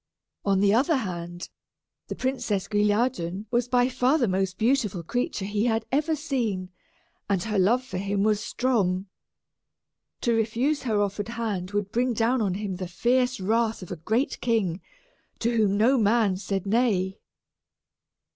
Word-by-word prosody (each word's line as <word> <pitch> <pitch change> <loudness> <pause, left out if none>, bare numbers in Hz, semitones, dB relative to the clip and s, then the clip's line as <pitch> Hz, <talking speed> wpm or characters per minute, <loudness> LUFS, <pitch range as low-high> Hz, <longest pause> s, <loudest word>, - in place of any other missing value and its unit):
On 195 -1 +2
the 200 0 +4
other 275 +8 +3
hand, 175 -7 -4 0.6
the - - -5
Princess 240 -7 -1
Guilliadun 210 -3 0
was 240 0 +1
by 245 0 +3
far 255 +3 +2
the 245 -6 +1
most 190 -1 -1
beautiful 220 -7 +1
creature 245 - -2
he 205 +2 0
had 225 -2 +1
ever 305 +4 +1
seen, 235 -11 -2 0.6
and 190 -3 +1
her 215 -3 0
love 235 +7 +3
for 185 -7 -5
him 200 +1 0
was 215 -1 +2
strong. 200 -9 0 1.2
To 235 - +2
refuse 230 +7 +1
her 220 -5 0
offered 205 0 -1
hand 215 -6 -3
would 205 0 -2
bring 245 +2 +1
down 235 +3 +1
on 195 -4 0
him 200 -2 -4
the 185 -1 -4
fierce 250 +7 +1
wrath 220 +2 0
of 180 - -10
a - - -2
great 220 - -1
king, 200 -7 0 0.6
to 235 +1 0
whom 205 -3 +2
no 245 +5 +4
man 215 -2 +3
said 195 0 -3
nay. 200 -4 +1
215 Hz, 155 wpm, -26 LUFS, 195-245 Hz, 1.2 s, the